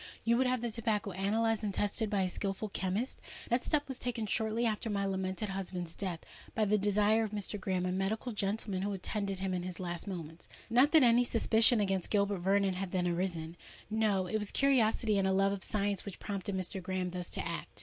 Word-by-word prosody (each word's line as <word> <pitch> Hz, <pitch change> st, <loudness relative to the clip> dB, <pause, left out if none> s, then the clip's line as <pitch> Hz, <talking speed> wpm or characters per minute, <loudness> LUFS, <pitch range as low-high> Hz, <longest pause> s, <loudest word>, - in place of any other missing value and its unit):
You 230 Hz, +1 st, +3 dB
would 260 Hz, +1 st, +3 dB
have 250 Hz, -1 st, 0 dB
the 240 Hz, -1 st, -2 dB
tobacco 215 Hz, -3 st, -1 dB
analysed 220 Hz, +4 st, +1 dB
and 205 Hz, -, 0 dB
tested 205 Hz, +3 st, -1 dB
by 200 Hz, -2 st, +1 dB
a -, -, +1 dB
skilful 195 Hz, +3 st, -3 dB
chemist? 195 Hz, +7 st, -2 dB, 0.3 s
That 240 Hz, +1 st, +2 dB
step 295 Hz, -1 st, +1 dB
was 265 Hz, -2 st, -5 dB
taken 240 Hz, -3 st, -2 dB
shortly 220 Hz, +2 st, 0 dB
after 220 Hz, 0 st, -1 dB
my 200 Hz, -1 st, 0 dB
lamented 190 Hz, +1 st, -2 dB
husband's 185 Hz, -3 st, -4 dB
death, 180 Hz, -5 st, -4 dB, 0.3 s
by 220 Hz, -, +2 dB
the 210 Hz, +1 st, +2 dB
desire 210 Hz, +2 st, +3 dB
of 220 Hz, -, -2 dB
Mr. 205 Hz, 0 st, -3 dB
Graham—a 185 Hz, -1 st, -1 dB
medical 195 Hz, +6 st, -1 dB
gentleman 200 Hz, -2 st, -1 dB
who 200 Hz, +1 st, -1 dB
attended 195 Hz, +1 st, -3 dB
him 190 Hz, 0 st, -2 dB
in 180 Hz, -, -1 dB
his 180 Hz, -1 st, -6 dB
last 175 Hz, +1 st, -4 dB
moments. 165 Hz, -4 st, -7 dB, 0.2 s
Not 255 Hz, +5 st, +5 dB
that 315 Hz, -4 st, +7 dB
any 240 Hz, 0 st, +6 dB
suspicion 230 Hz, 0 st, +4 dB
against 195 Hz, -3 st, 0 dB
Gilbert 200 Hz, -2 st, +1 dB
Vernon 195 Hz, +1 st, +2 dB
had 185 Hz, 0 st, -3 dB
then 180 Hz, -1 st, 0 dB
arisen: 170 Hz, -2 st, -2 dB, 0.4 s
no—it 215 Hz, -2 st, +1 dB
was 210 Hz, -1 st, -2 dB
curiosity 225 Hz, -6 st, +3 dB
and 190 Hz, -, +2 dB
a -, -, +2 dB
love 195 Hz, +1 st, +3 dB
of 200 Hz, -1 st, -1 dB
science 205 Hz, -2 st, 0 dB
which 200 Hz, -, -7 dB
prompted 200 Hz, -1 st, -3 dB
Mr. 185 Hz, +1 st, -2 dB
Graham 185 Hz, 0 st, -2 dB
thus 180 Hz, -1 st, -5 dB
to -, -, -3 dB
act." -, -, -6 dB
200 Hz, 210 wpm, -32 LUFS, 190-220 Hz, 0.4 s, that